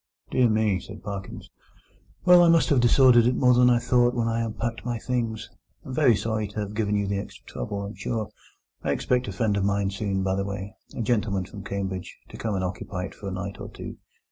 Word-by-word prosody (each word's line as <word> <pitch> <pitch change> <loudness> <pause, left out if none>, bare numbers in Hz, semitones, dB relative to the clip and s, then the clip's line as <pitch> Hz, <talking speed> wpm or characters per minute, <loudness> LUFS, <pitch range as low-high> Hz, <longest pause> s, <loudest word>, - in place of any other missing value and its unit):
"Dear 125 -2 +4
me," 110 -3 +2
said 105 +4 -11
Parkins. 100 -2 -7 0.7
"Well, 180 -1 +8
I 170 - +6
may 165 -1 +5
have 140 - +3
disordered 120 -1 +6
it 125 - +2
more 125 0 +4
than 125 0 +5
I 120 - +5
thought 120 0 +2
when 115 -1 0
I 115 0 0
unpacked 115 +1 -3
my 120 -1 -2
things. 115 -2 -2 0.4
I'm 130 - -6
very 130 -5 +4
sorry 110 0 -1
to 105 +2 -7
have 105 0 -5
given 105 -1 0
you 100 0 +1
the 100 0 -1
extra - - -9
trouble, 100 +12 -5
I'm 100 +1 -6
sure. 110 -2 -3 0.6
I - - +1
expect 125 -1 0
a - - -3
friend 105 +1 0
of 100 - 0
mine 100 0 +1
soon, 100 -1 -2
by 95 0 +1
the 100 +1 0
way—a 100 +4 -7
gentleman 105 -5 0
from 100 +1 -10
Cambridge—to 95 -2 -5
come 110 -3 -2
and 95 - -1
occupy 90 0 -4
it 95 - -6
for 100 - -9
a - - -3
night 100 +1 -5
or - - -6
two. - - -8
105 Hz, 220 wpm, -26 LUFS, 100-120 Hz, 0.7 s, Well